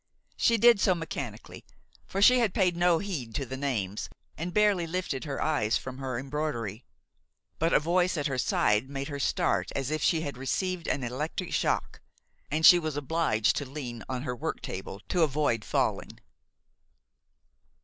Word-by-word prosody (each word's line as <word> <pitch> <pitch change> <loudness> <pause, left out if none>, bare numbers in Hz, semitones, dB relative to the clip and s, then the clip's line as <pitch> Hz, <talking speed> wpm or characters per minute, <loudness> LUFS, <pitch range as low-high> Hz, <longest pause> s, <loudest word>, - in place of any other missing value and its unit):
She 230 - +3
did 235 -1 +6
so 185 -2 +3
mechanically, 140 -9 -6 0.4
for 195 +1 0
she 250 +3 +7
had 225 -6 +1
paid 180 -3 +2
no 175 -1 +3
heed 160 - -5
to 140 - -1
the 130 +1 -6
names, 115 -8 -2 0.3
and 170 +3 -4
barely 205 -4 +2
lifted 165 -6 -3
her 140 -2 -4
eyes 115 -9 +1
from 130 0 -8
her 130 -2 -3
embroidery; 130 -5 -4 0.7
but 165 +1 +2
a - - +5
voice 175 +3 +1
at 145 - -2
her 135 -3 -1
side 105 +1 +2
made 140 0 -4
her 140 -1 -5
start - - 0
as 135 +1 -2
if 155 -1 -1
she 160 +2 +2
had 140 -5 -5
received 180 +6 -2
an 135 - -1
electric 150 +9 -4
shock, - - -1 0.5
and 155 +2 +1
she 175 - +10
was 155 -3 -3
obliged 145 -7 +1
to 145 -3 -4
lean 125 -5 -6
on 130 -1 -3
her 125 -3 -3
worktable 95 -4 -5
to 180 - +1
avoid 145 -7 +1
falling. - - -1
145 Hz, 170 wpm, -28 LUFS, 130-175 Hz, 0.7 s, she